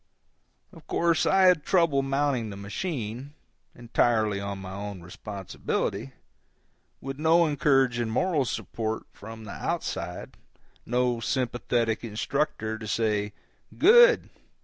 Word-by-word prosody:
Of - - -16
course 170 -1 +2
I 190 0 +4
had 180 -5 +5
trouble 170 -7 +3
mounting 135 -4 0
the 100 - -8
machine, 125 - -5 0.4
entirely 115 -3 +1
on 100 0 -4
my 95 -1 -8
own 100 -1 -6
responsibility, 95 -7 -4 0.9
with 135 +1 -6
no 165 +2 +4
encouraging 135 -5 +2
moral 150 +4 +1
support 110 0 -3
from 110 +2 -10
the 105 - -8
outside, 90 +1 -4 0.5
no 125 0 +1
sympathetic 120 -2 -1
instructor 110 0 -2
to 110 - -7
say, 105 -2 0 0.4
"Good! 480 +8 +6
120 Hz, 110 wpm, -27 LUFS, 105-145 Hz, 0.9 s, Good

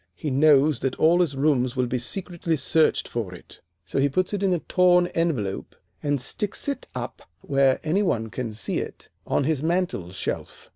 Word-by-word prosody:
He 150 - -4
knows 145 0 +4
that 135 -1 -1
all 170 +3 +4
his 155 -6 0
rooms 135 -3 +1
will 125 -1 +1
be 125 +1 -2
secretly 170 +4 -2
searched 155 +3 +2
for 105 -7 -4
it, - - -14 0.2
so 135 - -2
he 140 +1 +3
puts 185 +8 0
it 200 - -1
in 195 -2 +2
a 180 - +2
torn 180 +1 +3
envelope 150 - -2 0.3
and 145 -1 0
sticks 200 - -1
it 280 - -3
up - - -5 0.2
where 135 -1 +2
any 165 +6 +1
one 115 - -1
can 125 -3 -4
see 105 -1 -2
it - - -8 0.2
on - - +1
his 150 -1 0
mantel 170 - -1
shelf. 95 - -5
145 Hz, 190 wpm, -24 LUFS, 125-175 Hz, 0.3 s, knows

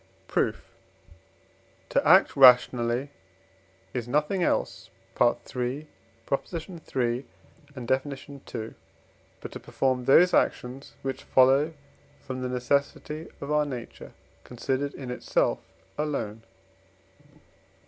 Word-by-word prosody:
Proof. - - 0 1.2
To - - +2
act - - +6
rationally, 125 0 +5 0.8
is 120 -2 -3
nothing 150 +8 0
else - - -1 0.3
(III. - - +5 0.2
iii. 130 +5 -2 1.9
and 125 -3 -7
Def. 130 +3 +1 0.5
ii.) 110 0 -5 0.7
but - - -7
to - - -7
perform 130 -2 -1
those 175 +7 +6
actions, 130 +3 0
which 135 -1 -3
follow 135 +5 +4 0.4
from 130 -1 -6
the 125 - -2
necessity, 140 +5 -1
of 140 +1 -5
our 150 0 +3
nature 125 -4 -8 0.3
considered 130 +3 -3
in 130 -3 -6
itself 125 - 0 0.4
alone. 125 -8 -2
130 Hz, 95 wpm, -27 LUFS, 125-145 Hz, 1.9 s, act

